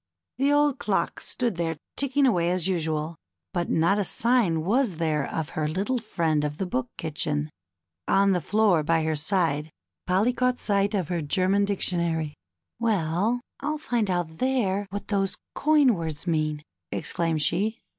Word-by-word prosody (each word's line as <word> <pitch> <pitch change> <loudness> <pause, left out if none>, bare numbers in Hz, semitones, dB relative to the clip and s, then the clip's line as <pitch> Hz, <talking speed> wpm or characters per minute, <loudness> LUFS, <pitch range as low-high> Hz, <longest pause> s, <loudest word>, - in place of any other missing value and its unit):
The 275 +2 +3
old 290 -2 +3
clock 190 -5 -1
stood 235 -7 -2
there 165 -2 -1 0.2
ticking 280 0 +2
away 175 -9 +2
as 180 0 0
usual, 160 -3 -1 0.4
but 175 - -1
not 170 +6 +3
a - - +2
sign 205 -6 +2
was 220 +1 +1
there 155 -3 0
of 160 -1 -3
her 155 -1 -2
little 200 +11 -1
friend 165 -9 0
of 150 0 -3
the 190 - -2
Book 130 -8 -2
Kitchen. 150 -1 -2 0.6
On 195 0 +4
the 180 -2 +1
floor 205 -5 +3
by 165 +1 +1
her 155 0 0
side, 155 -2 0 0.4
Polly 195 +7 +2
caught 250 0 +1
sight 200 -1 +1
of 185 -6 -1
her 175 -2 -1
German 185 +7 +2
Dictionary. 170 -6 0 0.5
^^Well, 210 +2 +1 0.2
I'll 300 +2 -2
find 240 -8 -1
out 175 -3 -2
there 205 -7 +1
what 205 +1 -6
those 195 -2 0 0.2
coin 295 -4 +4
words 160 -4 -4
mean," 155 -3 -1 0.3
exclaimed 165 -3 0
she. 210 +9 +1
180 Hz, 160 wpm, -26 LUFS, 160-215 Hz, 0.6 s, On